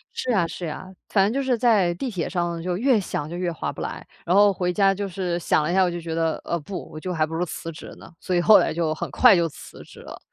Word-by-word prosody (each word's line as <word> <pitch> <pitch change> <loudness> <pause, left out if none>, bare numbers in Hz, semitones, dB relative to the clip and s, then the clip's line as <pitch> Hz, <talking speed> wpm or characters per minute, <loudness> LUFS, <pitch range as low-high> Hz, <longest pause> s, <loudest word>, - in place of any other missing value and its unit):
是 255 - -2
呀， 190 -7 +2
是 175 +1 -6
呀， 175 +4 -7 0.2
反 195 -2 +3
正 210 - 0
就 275 +1 -1
是 255 -2 +1
在 215 -7 +3
地 250 +10 -4
铁 185 -8 -3
上 175 -2 -2
就 180 +1 -2
越 245 +1 +3
想 155 -6 -4
就 170 - -6
越 175 -1 -2
划 165 - -4
不 - - -9
来， - - -5 0.2
然 175 - +2
后 205 0 +6
回 180 -2 -1
家 195 0 +3
就 200 +1 -4
是 180 -2 -3
想 160 - +1
了 155 - -1
一 - - 0
下， 190 - +5
我 180 - +1
就 175 - -4
觉 165 -1 -5
得， 165 -1 -1
呃， 170 - -2
不， 180 +5 -7
我 155 - -8
就 180 +3 -4
还 160 -2 +1
不 160 - -9
如 175 +2 0
辞 165 0 -6
职 160 - -11
呢， - - -14
所 185 - -2
以 175 - +3
后 215 +4 +7
来 - - +1
就 160 -1 0
很 170 0 -5
快 150 - +6
就 170 -2 +2
辞 155 - -12
职 - - -15
了， - - -10
175 Hz, 320 characters per minute, -23 LUFS, 165-195 Hz, 0.2 s, 后